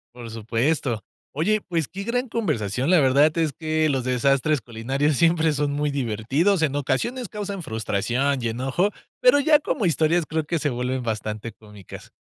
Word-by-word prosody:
Por 120 -2 -8
supuesto. 115 +2 -1 0.3
Oye, 205 +9 +1
pues, 165 -7 -2
qué 195 +1 -7
gran 245 +3 -1
conversación, 135 - -1
la 180 -3 +6
verdad, 145 +4 +4
es 160 -4 +1
que 155 0 0
los 135 -4 0
desastres 135 +3 +2
culinarios 130 +6 -1
siempre 165 +1 +3
son 145 0 0
muy 145 +1 -1
divertidos. 140 - 0
En 145 -3 +1
ocasiones 210 - -1
causan 200 -4 -5
frustración, 120 +5 -1
y 115 - 0
enojo, 135 - 0 0.3
pero - - +6
ya 300 +1 +5
como 235 -8 -2
historias, 165 +1 +2
creo 160 0 -1
que 165 0 -1
se 145 - 0
vuelven 125 +1 -2
bastante 110 0 -4
cómicas. 105 -3 -13
145 Hz, 165 wpm, -23 LUFS, 120-170 Hz, 0.3 s, la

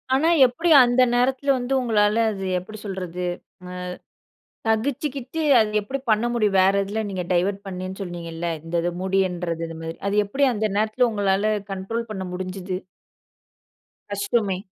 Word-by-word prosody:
ஆனா, 310 +5 +3 0.2
எப்படி 255 +8 0
அந்த 245 +1 +3
நேரத்தில 260 +3 +2
வந்து, 250 +1 -2
உங்களால 215 -2 +2
அது 195 -2 -5
எப்படி 215 +4 -10
சொல்றது. 180 -2 -4 0.5
அ - - -7 0.9
சகிச்சுக்கிட்டு, 270 +5 -1 0.2
அது 215 -1 +1
எப்படி 265 +7 -4
பண்ண 215 +1 +3
முடியும், 210 -4 +2
வேற 190 +1 +4
இதில 210 +3 -3
நீங்க 185 -2 -3
டைவர்ட் 190 +3 +1
பண்ணேண்னு 185 +1 -6
சொன்னீங்கல்ல, 170 -2 -5 0.2
இந்த 165 +1 -7
இது 175 - 0
முடியுன்றது, 180 -3 -1
இது 165 - -8
மாதிரி. 165 0 -5
அது 200 - 0
எப்படி 270 +8 0
அந்த 215 -1 0
நேரத்தில 220 +4 +2
உங்களால 205 0 +1 0.2
கண்ட்ரோல் 225 +5 -4
பண்ண 190 -3 -4
முடிஞ்சுது? 185 0 -4 1.4
கஷ்டமே. 200 -1 0
205 Hz, 145 wpm, -23 LUFS, 185-235 Hz, 1.4 s, வேற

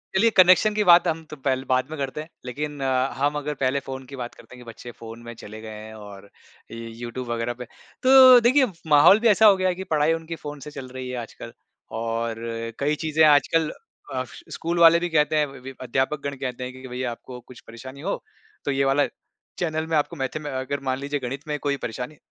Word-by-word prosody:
चलिए 220 +5 +5
कनेक्शन 185 +3 +6
की 210 - +2
बात 175 -1 +6
हम 160 0 -1
तो 150 - -7
पहले 130 -1 -1
बाद 130 +2 +1
में 155 - -5
करते 135 +2 -3
हैं। 155 - -11 0.2
लेकिन 145 +3 -5
अ, 130 0 +1
हम 145 +2 +1
अगर 150 0 -3
पहले 130 +1 +2
फ़ोन 130 0 -7
की 140 - -9
बात 125 -2 -6
करते - - -15
हैं 125 - -13
कि - - -19
बच्चे 120 +1 -10
फ़ोन 115 0 -9
में 120 - -6
चले 110 0 -10
गए 110 - -8 0.2
हैं 110 - -10
और 100 -2 -12 0.4
यूट्यूब 115 +2 -7
वग़ैरह 120 +1 -2
पे, 125 +1 -9 0.4
तो 260 -1 +9
देखिए 255 +4 +4 0.2
माहौल 150 +7 +7
भी 230 - +2
ऐसा 220 +1 +5
हो 205 - +8
गया 185 0 +1
है 180 - -1
कि 190 - -6
पढ़ाई 155 +1 +3
उनकी 165 0 -5
फ़ोन 145 -1 -6
से 150 - -8
चल 135 -3 -8
रही 130 0 -7
है 125 - -4
आजकल 115 - -10 0.5
और 115 0 -2 0.4
कई 150 +2 +1
चीज़ें 155 0 +3
आजकल 150 +2 +3 0.4
अ, 130 - -1 0.3
स्कूल 170 +1 -2
वाले 170 0 +7
भी 175 - -2
कहते 155 -1 +2
हैं 150 - +3
वि 135 -1 -10
अध्यापकगण 135 +3 -2
कहते 125 -1 -4
हैं 125 - -6
कि 130 0 -10
भई 125 0 -5
आपको 125 +1 -11
कुछ 125 - -12
परेशानी 130 +4 -10
हो, - - -3 0.4
तो 145 - 0
ये 135 0 +1
वाला 135 +1 +3 0.5
चैनल 160 -2 -1
में 160 -1 +1
आपको 145 - -1
मैथमें 145 +3 -4
अगर 130 +2 -3
मान 130 - 0
लीजिए 145 +1 -3
गणित 135 +4 -6
में 150 - -2
कोई 140 -1 -1
परेशानी 125 +6 -7
140 Hz, 225 wpm, -24 LUFS, 125-155 Hz, 0.5 s, तो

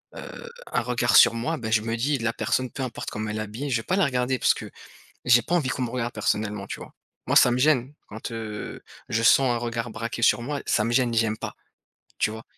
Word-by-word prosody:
heu, 475 - -9 0.2
un - - +1
regard - - +1
sur - - +8
moi, 155 +8 -2
ben 110 -4 -5
je 110 - +4
me 115 +1 -2
dis 140 +4 +1
la 115 -1 -1
personne, 130 +1 -1
peu 135 - -4
importe 125 -3 -5
comment 110 0 -4
elle 105 - -3
est - - -2
habillée, 110 +7 -5
je 125 - +2
vais 115 - -5
pas 185 - +1
la 195 - +3
regarder 130 -1 0
parce - - +4
que - - -8 0.6
j'ai 125 -1 +6
pas 175 - -4
envie 155 -7 +1
qu'on 130 - -2
me 120 - -2
regarde 120 -1 -3
personnellement, 105 -1 -1
tu - - -6
vois? - - -11 0.3
Moi, - - +1
ça 125 - +7
me 120 - +1
gêne 135 -1 +2
quand, 110 +2 -7
heu, 110 -2 -6 0.3
je 115 - 0
sens 130 +1 +5
un 120 - 0
regard 120 0 -3
braqué 115 +1 -5
sur 115 - +4
moi, 140 +2 -3
ça 105 - +2
me 115 - -1
gêne, 120 -2 +2
j'aime 110 -1 +1
pas, - - -6 0.6
tu - - +1
vois? 110 +1 -8
120 Hz, 255 wpm, -25 LUFS, 110-130 Hz, 0.6 s, sur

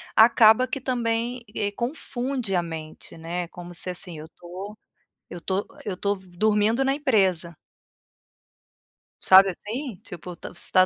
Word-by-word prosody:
acaba 225 +2 +6
que 270 +2 -4
também, 240 -1 -1
eh, 205 -1 -1
confunde 245 -2 -3
a 175 - +3
mente, 160 -2 -8
né. 170 +2 -4
Como 175 0 -10
se, 185 - -2
assim: 180 -2 -5
"Eu 155 - -9
tô 185 +6 -9 0.5
eu 175 - -7
tô 190 +3 -2 0.2
eu 195 -3 -3
tô 200 +2 0
dormindo 210 +6 +1
na 270 0 +2
empresa". 190 - +1 1.7
Sabe, 190 +1 +7
assim, 220 +5 -5
tipo, 175 0 -9
t - - -9
você 175 - -8
tá 185 0 +6
200 Hz, 145 wpm, -25 LUFS, 175-235 Hz, 1.7 s, Sabe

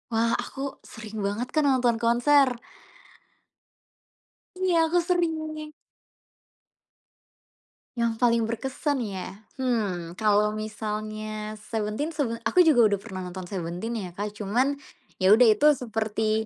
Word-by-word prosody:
Wah, 230 +1 +2
aku 270 - -8 0.3
sering 220 -2 -8
banget, 215 +5 -2
Kak, 310 - +3
nonton 250 -4 +3
konser. 265 +4 +4 2.1
Iya, 370 -2 +1
aku 350 +2 +1
sering. 315 -3 -1 2.2
Yang 235 -1 +1
paling 235 -1 +4
berkesan, 265 +4 -2
ya? 195 -1 -6 0.2
Hmm, 205 -10 -1
kalau 210 +1 +2
misalnya 215 0 -5
Seventen 215 +8 -3
sebe 245 -7 -1
aku 365 - +5
juga 275 -9 +6
udah 200 - 0
pernah 190 -4 -7
nonton 180 0 -7
Seventeen 185 +4 -4
ya, 185 -4 -5
Kak. 205 +2 -5
Cuman 250 +8 0 0.4
ya 190 +2 +5
udah 240 +1 +6
itu 250 +8 +3
seperti 220 -3 -1
225 Hz, 115 wpm, -26 LUFS, 210-265 Hz, 2.2 s, juga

